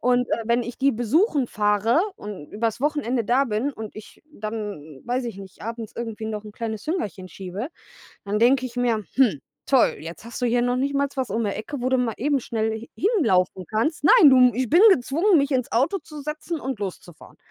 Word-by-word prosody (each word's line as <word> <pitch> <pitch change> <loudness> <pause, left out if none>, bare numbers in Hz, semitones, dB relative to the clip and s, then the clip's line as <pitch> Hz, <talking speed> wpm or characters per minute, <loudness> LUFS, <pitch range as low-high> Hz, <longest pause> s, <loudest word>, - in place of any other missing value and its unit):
und, 250 0 +2
äh, 230 - 0
wenn 235 +1 +2
ich 240 +1 -7
die 275 0 +3
besuchen 275 - +2
fahre 210 +6 +2 0.2
und 200 -8 -9
übers 225 +2 -2
Wochenende 280 -5 0
da 255 +5 +3
bin 235 +3 -1
und 220 -4 -8
ich 215 - -13
dann, 205 - -6
weiß 245 +1 -1
ich 230 - -6
nicht, 195 -1 -12
abends 230 0 -6
irgendwie 225 -2 -5
noch 215 -1 -4
'n 210 - -10
kleines 220 -1 -5
Hüngerchen 205 - -3
schiebe, 195 +8 -6 0.6
dann 205 +1 0
denke 255 +3 +4
ich 245 -1 -12
mir: 235 -4 0
„Hm, 230 - +3 0.2
toll, 265 -3 +3
jetzt 165 +7 -9
hast 235 +2 -7
du - - +3
hier 240 +1 +2
noch 245 0 +1
nicht 275 +2 -1
mal 280 0 +2
was 260 -5 -2
um 225 +3 -1
die 205 - 0
Ecke, 245 +7 -5
wo 250 - 0
du 260 - +3
mal 245 -3 0
eben 285 +1 +1
schnell 220 -1 -2
h 230 - -10
hinlaufen 220 - +1
kannst.“ 275 +10 -1
Nein, 465 -12 +8
du, 255 -2 +6
ich 255 +1 -1
bin 340 - +5
gezwungen, 330 +6 +2
mich 280 0 +1
ins 255 -3 -1
Auto 270 - +2
zu 305 -4 -11
setzen 305 +2 -5
und 265 -3 -4
loszufahren. 180 -4 -8
235 Hz, 210 wpm, -24 LUFS, 215-270 Hz, 0.6 s, Nein